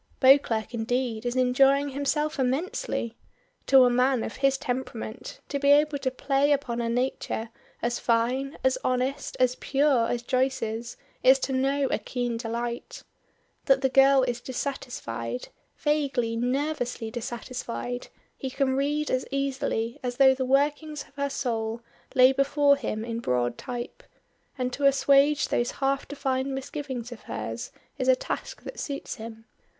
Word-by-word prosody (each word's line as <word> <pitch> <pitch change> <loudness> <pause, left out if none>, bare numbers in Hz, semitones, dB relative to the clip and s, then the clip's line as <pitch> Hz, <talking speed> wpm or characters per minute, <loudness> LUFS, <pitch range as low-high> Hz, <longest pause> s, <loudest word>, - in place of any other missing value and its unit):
Beauclerk 250 -5 +4
indeed 235 0 -1
is 240 - -2
enjoying 270 +3 +4
himself 285 +2 -1
immensely. 265 - -1 0.5
To 265 -1 +8
a 245 - +3
man 250 0 +2
of - - -6
his 275 0 +2
temperament 250 - -5
to 280 - -1
be 280 0 +2
able 295 0 +4
to 265 - 0
play 275 +2 +1
upon 265 -5 0
a 230 - -1
nature 235 -2 -2 0.3
as 240 0 0
fine, 250 +4 0
as 260 0 +2
honest, 255 +2 -1
as 255 -1 +4
pure 275 -4 +2
as 240 0 -2
Joyce's 240 -3 -1 0.2
is 260 +1 +7
to 265 - -1
know 275 +2 +1
a - - +1
keen 245 -2 -3
delight. 235 +1 -4 0.6
That 270 -1 +4
the 265 - +2
girl 270 0 +6
is 245 -1 -2
dissatisfied, 125 - -4 0.3
vaguely, 280 -6 0
nervously 245 -2 -1
dissatisfied, 240 +1 -5 0.3
he 265 - -5
can 265 0 0
read 295 +2 0
as 255 0 0
easily 275 -4 -2
as 245 -1 -4
though 265 -1 +7
the 260 0 -2
workings 290 +2 +1
of - - -26
her 280 0 -2
soul 230 -4 -2 0.3
lay 255 0 +7
before 280 +1 +3
him 220 -5 -4
in 230 0 -3
broad 125 - 0
type, 245 - -6 0.6
and 250 -1 -2
to 280 +1 +3
assuage 275 +1 +4
those 240 - +1
half 275 0 0
defined 270 -1 -2
misgivings 265 -3 -5
of 240 - -9
hers 115 +1 -5 0.3
is 255 - -1
a 260 - +6
task - - -5
that - - -8
suits 280 -2 -5
him. 225 0 -9
260 Hz, 150 wpm, -27 LUFS, 240-275 Hz, 0.6 s, To